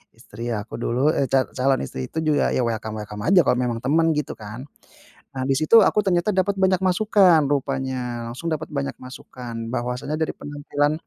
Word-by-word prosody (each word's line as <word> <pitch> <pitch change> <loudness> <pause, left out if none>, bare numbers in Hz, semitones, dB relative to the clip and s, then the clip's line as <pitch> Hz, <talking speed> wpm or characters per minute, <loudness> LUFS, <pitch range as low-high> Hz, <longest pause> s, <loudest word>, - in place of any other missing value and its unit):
istri 115 +3 -8
aku 105 0 -5
dulu, 130 +6 +1
eh, 140 - +1
ca 135 -1 +3
calon 135 +1 +2
istri 65 0 -6
itu - - -2
juga 155 -1 +2
ya, - - +1
welcome-welcome 110 -2 -4
aja 185 +1 +6
kalau - - +3
memang 120 -2 -1
teman, 165 +5 +3
gitu 150 - -2
kan. 110 +5 -8 0.7
Nah, 130 - -2
di 135 - +3
situ 225 +9 +6
aku 210 - +2
ternyata 180 +2 +2
dapat 190 +2 +1
banyak 190 -1 +3
masukan, 185 -3 +4
rupanya 130 -3 -2
langsung 150 +8 -6
dapat 155 0 -4
banyak 140 -1 -3
masukan, 125 -2 -9 0.2
bahwasanya 125 +5 -2
dari 160 - 0
penampilan 145 0 -1
135 Hz, 180 wpm, -23 LUFS, 120-160 Hz, 0.7 s, aja